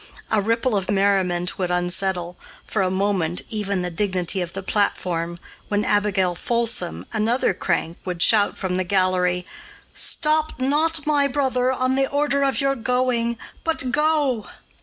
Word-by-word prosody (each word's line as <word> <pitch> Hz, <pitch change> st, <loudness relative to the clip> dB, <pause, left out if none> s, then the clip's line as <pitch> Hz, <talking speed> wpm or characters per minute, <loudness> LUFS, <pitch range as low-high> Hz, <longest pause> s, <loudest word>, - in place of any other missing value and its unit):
A 215 Hz, -, +3 dB
ripple 230 Hz, +3 st, +1 dB
of 195 Hz, -2 st, -1 dB
merriment 195 Hz, -3 st, +1 dB
would 180 Hz, -2 st, -1 dB
unsettle, 180 Hz, 0 st, -1 dB, 0.3 s
for 215 Hz, -, -1 dB
a 185 Hz, -, +1 dB
moment, 190 Hz, -3 st, 0 dB
even 200 Hz, -4 st, -1 dB
the 180 Hz, -, -3 dB
dignity 185 Hz, 0 st, +1 dB
of 175 Hz, -1 st, -5 dB
the 195 Hz, -, -5 dB
platform 175 Hz, -4 st, -1 dB, 0.3 s
when 205 Hz, 0 st, 0 dB
Abigail 200 Hz, -3 st, +1 dB
Folsom, 220 Hz, -, -1 dB
another 225 Hz, +4 st, +1 dB
crank, 170 Hz, -1 st, -2 dB
would 180 Hz, -2 st, -4 dB
shout 205 Hz, +3 st, +4 dB
from 185 Hz, -2 st, -2 dB
the 185 Hz, -, 0 dB
gallery, 180 Hz, -1 st, +1 dB, 0.5 s
"Stop 310 Hz, -2 st, +1 dB
not, 300 Hz, +4 st, +1 dB
my 290 Hz, -2 st, +3 dB
brother, 260 Hz, -2 st, 0 dB
on 255 Hz, 0 st, 0 dB
the 270 Hz, 0 st, +1 dB
order 285 Hz, 0 st, +1 dB
of 275 Hz, -1 st, +1 dB
your 275 Hz, -1 st, +2 dB
going, 245 Hz, -1 st, 0 dB, 0.3 s
but 290 Hz, -6 st, -1 dB
go." 295 Hz, -7 st, +1 dB
205 Hz, 150 wpm, -22 LUFS, 180-255 Hz, 0.5 s, shout